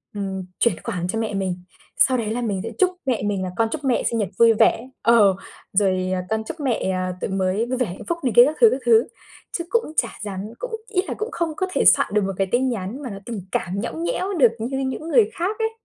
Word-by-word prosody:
ừm, 190 Hz, -2 st, -4 dB
chuyển 235 Hz, -, +3 dB
khoản 180 Hz, -7 st, -3 dB
cho 225 Hz, +5 st, -2 dB
mẹ 220 Hz, -2 st, -2 dB
mình, 190 Hz, -2 st, -2 dB, 0.4 s
sau 260 Hz, -1 st, +4 dB
đấy 220 Hz, -2 st, -2 dB
là 245 Hz, -, -2 dB
mình 205 Hz, -5 st, -1 dB
sẽ 230 Hz, -, -4 dB
chúc 370 Hz, -, +5 dB, 0.2 s
mẹ 255 Hz, -4 st, 0 dB
mình 200 Hz, -2 st, -1 dB
là 185 Hz, -, -3 dB
"con 225 Hz, -1 st, +2 dB
chúc 300 Hz, -, -4 dB
mẹ 260 Hz, -3 st, +1 dB
sinh 230 Hz, -, 0 dB
nhật 205 Hz, -4 st, -1 dB
vui 230 Hz, -1 st, +7 dB
vẻ", 230 Hz, +3 st, +2 dB
ờ, 215 Hz, -5 st, +5 dB, 0.4 s
rồi, 185 Hz, -2 st, +2 dB
ờ, 185 Hz, -, -1 dB
"con 220 Hz, 0 st, -1 dB
chúc 325 Hz, -, -7 dB
mẹ, 250 Hz, -8 st, 0 dB
à, 185 Hz, 0 st, -2 dB
tuổi -, -, -2 dB
mới 190 Hz, +3 st, 0 dB
vui 255 Hz, +1 st, -2 dB
vẻ, 250 Hz, -, +1 dB
hạnh 180 Hz, -3 st, -8 dB
phúc" 340 Hz, -, 0 dB
này 250 Hz, -, 0 dB
kia 240 Hz, +1 st, +9 dB
các 305 Hz, -, -1 dB
thứ, 460 Hz, -, +8 dB
các 265 Hz, -, -1 dB
thứ, 230 Hz, 0 st, +5 dB, 0.5 s
chứ 340 Hz, -, -4 dB
cũng 465 Hz, -9 st, 0 dB
chả 235 Hz, -, +2 dB
dám 195 Hz, -3 st, -5 dB, 0.2 s
cũng -, -, -5 dB, 0.2 s
ý 380 Hz, -4 st, +1 dB
là -, -, -2 dB
cũng 435 Hz, +2 st, -3 dB
không 335 Hz, -1 st, -1 dB
có 375 Hz, -, 0 dB
thể -, -, +1 dB
soạn -, -, +6 dB
được 210 Hz, -, +3 dB
1 195 Hz, -, -2 dB
cái 195 Hz, -, +1 dB
tin 255 Hz, +2 st, +2 dB
nhắn 230 Hz, +4 st, -4 dB
mà 255 Hz, -, -4 dB
nó 195 Hz, -, -7 dB
tình 230 Hz, -5 st, -5 dB
cảm 185 Hz, +3 st, -2 dB
nhõng 165 Hz, -7 st, -4 dB
nhẽo 370 Hz, -, -1 dB
được 255 Hz, -, +5 dB
như 250 Hz, +4 st, -3 dB
những 270 Hz, +4 st, -3 dB
người 435 Hz, +3 st, +4 dB
khác 365 Hz, +5 st, -2 dB
ấy. 445 Hz, -, +1 dB
230 Hz, 265 wpm, -22 LUFS, 195-265 Hz, 0.5 s, kia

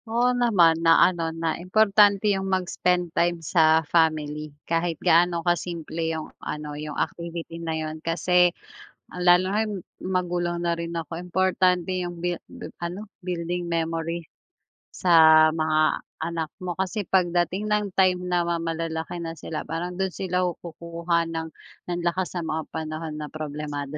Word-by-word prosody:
Oo 240 Hz, +2 st, +2 dB
naman! 185 Hz, -10 st, +4 dB
Na 165 Hz, 0 st, +6 dB
ano 170 Hz, -3 st, 0 dB
na 165 Hz, 0 st, -2 dB
importante 200 Hz, +1 st, +4 dB
yung 195 Hz, 0 st, -2 dB
mag-spend 180 Hz, -2 st, 0 dB
time 175 Hz, 0 st, +2 dB
sa 160 Hz, 0 st, +4 dB
family. 155 Hz, -1 st, +1 dB, 0.2 s
Kahit 165 Hz, 0 st, 0 dB
gaano 170 Hz, 0 st, +3 dB
ka-simple 170 Hz, -2 st, -2 dB
yung 160 Hz, -1 st, -3 dB, 0.2 s
ano 150 Hz, 0 st, -5 dB
yung 150 Hz, 0 st, -6 dB
activity 170 Hz, 0 st, -4 dB
na 160 Hz, -1 st, -2 dB
yun. 155 Hz, 0 st, -5 dB
Kasi 180 Hz, +2 st, +3 dB, 0.7 s
lalo 180 Hz, +1 st, +4 dB
ngayon 215 Hz, 0 st, 0 dB, 0.3 s
magulang 175 Hz, -2 st, -1 dB
na 170 Hz, 0 st, 0 dB
rin 170 Hz, 0 st, -5 dB
ako, 165 Hz, -1 st, -4 dB
importante 185 Hz, 0 st, +1 dB
yung 175 Hz, -1 st, -6 dB
bi 175 Hz, +1 st, -1 dB, 0.2 s
bi -, -, -8 dB, 0.2 s
ano? 185 Hz, +5 st, -5 dB, 0.2 s
building 175 Hz, 0 st, -3 dB
memory 165 Hz, 0 st, -2 dB, 0.7 s
sa 160 Hz, -3 st, +6 dB
mga 155 Hz, -1 st, +1 dB, 0.2 s
anak 165 Hz, -2 st, -4 dB
mo. 180 Hz, -1 st, -4 dB
Kasi 190 Hz, +3 st, -1 dB
pagdating 180 Hz, +2 st, +1 dB
ng 210 Hz, -1 st, 0 dB
time 185 Hz, -1 st, +4 dB
na 175 Hz, -1 st, +1 dB
ma 170 Hz, -1 st, -1 dB
malalaki 165 Hz, 0 st, -3 dB
na 165 Hz, -1 st, -5 dB
sila, 155 Hz, -1 st, -6 dB
parang 175 Hz, +2 st, -4 dB
dun 190 Hz, -1 st, -1 dB
sila 185 Hz, -1 st, -1 dB, 0.2 s
kukuha 170 Hz, 0 st, -2 dB
ng 165 Hz, -1 st, -4 dB, 0.4 s
ng 175 Hz, 0 st, -1 dB
lakas 180 Hz, +1 st, -1 dB
sa 170 Hz, -, -3 dB
mga 160 Hz, 0 st, -3 dB
panahon 155 Hz, 0 st, -5 dB
na 150 Hz, -1 st, -7 dB
problemado 150 Hz, -1 st, -5 dB
170 Hz, 150 wpm, -25 LUFS, 160-180 Hz, 0.7 s, Na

